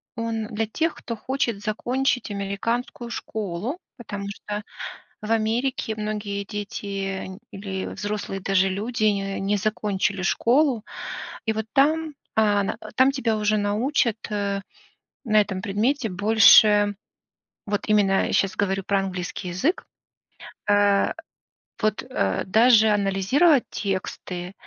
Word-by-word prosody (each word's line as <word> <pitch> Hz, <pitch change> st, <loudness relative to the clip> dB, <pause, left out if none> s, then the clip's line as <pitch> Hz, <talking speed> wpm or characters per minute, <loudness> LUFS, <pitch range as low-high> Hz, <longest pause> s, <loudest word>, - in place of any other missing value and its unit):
он 225 Hz, -2 st, -2 dB
для 220 Hz, +1 st, -2 dB
тех, 320 Hz, +9 st, -1 dB
кто 230 Hz, -, -6 dB
хочет 235 Hz, -2 st, -2 dB
закончить 245 Hz, +3 st, 0 dB
американскую 230 Hz, +5 st, -3 dB
школу, 220 Hz, -, -4 dB, 0.2 s
потому 205 Hz, -5 st, -6 dB
что 205 Hz, +1 st, -5 dB, 0.6 s
в 215 Hz, +1 st, -4 dB
Америке 225 Hz, +1 st, 0 dB
многие 210 Hz, -1 st, -3 dB
дети 195 Hz, -2 st, -4 dB
или 195 Hz, -1 st, -5 dB
взрослые, 205 Hz, -2 st, -4 dB
даже 195 Hz, 0 st, +2 dB
люди, 215 Hz, +4 st, -3 dB
н 195 Hz, -2 st, 0 dB
не 205 Hz, +1 st, +2 dB
закончили 200 Hz, -1 st, -1 dB
школу. 245 Hz, +4 st, +2 dB, 0.6 s
И 220 Hz, -, +2 dB
вот 220 Hz, 0 st, -3 dB
там, 310 Hz, +2 st, +2 dB, 0.2 s
а, 205 Hz, -2 st, +3 dB
на, -, -, -2 dB
а, 255 Hz, +5 st, +2 dB
тебя 240 Hz, -5 st, 0 dB
уже 215 Hz, 0 st, +1 dB
научат, 220 Hz, +3 st, +1 dB
э, 200 Hz, -1 st, -1 dB, 0.6 s
на 215 Hz, -2 st, +4 dB
этом 195 Hz, -2 st, -1 dB
предмете 225 Hz, +5 st, 0 dB
больше, 205 Hz, +1 st, +6 dB, 0.7 s
вот 205 Hz, 0 st, -2 dB
именно, 200 Hz, -2 st, +3 dB
я -, -, -3 dB
щас 190 Hz, -1 st, +1 dB
говорю 195 Hz, -1 st, 0 dB
про 200 Hz, 0 st, +2 dB
английский 185 Hz, 0 st, -4 dB
язык, 190 Hz, -, 0 dB, 0.9 s
э, 205 Hz, -1 st, +4 dB, 0.7 s
вот, 215 Hz, 0 st, 0 dB
э, 100 Hz, -, -1 dB
даже 220 Hz, +2 st, +5 dB
анализировать 210 Hz, -, +3 dB
тексты, 185 Hz, -2 st, -4 dB
210 Hz, 120 wpm, -24 LUFS, 195-230 Hz, 0.9 s, больше